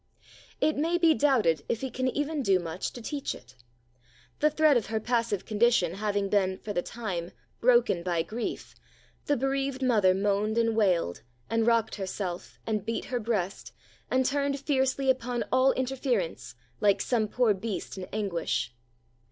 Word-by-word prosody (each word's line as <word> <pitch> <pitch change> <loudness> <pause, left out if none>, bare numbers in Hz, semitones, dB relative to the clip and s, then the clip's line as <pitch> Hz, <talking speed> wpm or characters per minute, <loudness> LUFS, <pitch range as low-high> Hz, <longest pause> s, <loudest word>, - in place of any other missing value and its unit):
It 310 - +2
may 330 +4 +1
be 335 -2 +5
doubted 230 - +2
if 230 +2 -1
it 265 - -4
can 260 0 -1
even 290 +3 -1
do 195 -7 +3
much 170 +1 -4
to 240 - -9
teach 285 +2 -3
it. 125 +2 -16 0.8
The 300 - +4
thread 305 -1 +4
of 235 - +1
her 220 +1 -1
passive 230 -4 -1
condition 215 -5 +2
having 205 0 -1
been, 190 -2 +1
for 205 - -6
the 175 - 0
time, 180 -6 -4 0.3
broken 240 -7 +4
by 170 -2 0
grief, 225 +6 -5 0.5
the 290 - +2
bereaved 270 +1 -1
mother 210 -7 +4
moaned 205 +2 0
and 230 -1 +2
wailed, 180 - +1 0.3
and 225 0 +2
rocked 230 -2 +3
herself, 185 -2 -5
and 215 -3 -1
beat 230 - -3
her 245 - +1
breast, 210 -4 -2 0.4
and 260 0 +2
turned 280 +1 0
fiercely 265 -1 +2
upon 245 -1 -2
all 260 +1 +5
interference, 250 - -2 0.2
like 200 -1 +3
some 225 -4 +1
poor 235 0 +2
beast 205 +1 -5
in 190 -1 -6
anguish. 175 - -2
225 Hz, 160 wpm, -28 LUFS, 195-260 Hz, 0.8 s, be